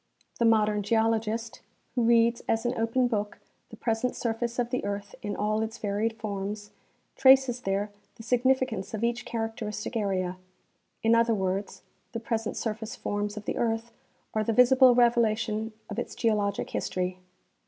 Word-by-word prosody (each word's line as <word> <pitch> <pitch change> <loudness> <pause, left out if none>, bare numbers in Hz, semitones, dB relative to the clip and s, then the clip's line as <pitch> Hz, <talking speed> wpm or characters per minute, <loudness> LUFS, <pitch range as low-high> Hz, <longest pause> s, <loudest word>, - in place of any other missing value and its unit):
The 235 - +3
modern 215 -2 +3
geologist, 225 +2 0 0.3
wdio 240 -2 +2
reads 235 0 +4
as 225 +1 +1
an 240 - +1
open 230 +3 +1
book 210 -3 -2 0.3
the - - -10
present 230 +2 -1
surface 235 0 -2
of 245 -1 -1
the 250 - -1
earth 205 0 -4
in 205 -3 -3
all 215 +1 0
its 220 0 -3
varied 210 +2 -1
forms, 205 -1 -5 0.4
traces 265 -2 +5
there 200 +1 -1 0.2
the 225 - -11
sig 240 +1 +1
nificance 260 -6 +1
of 220 - -4
each 235 +1 0
characteristic 225 -1 -4
area; 185 -4 -1 0.7
in 225 +1 +4
other 230 0 +4
words, 190 0 -2 0.3
the 230 - -2
present 225 -1 -2
surface 220 0 -3
forms 205 0 -3
of 210 - -7
the - - -2
earth 230 0 -1 0.4
are 215 - +1
the 225 - 0
visible 250 +1 +6
revelation 225 -2 +2 0.2
of 210 +2 -4
its - - -5
geologic 210 -3 0
history. 185 0 -2
225 Hz, 160 wpm, -28 LUFS, 210-235 Hz, 0.7 s, visible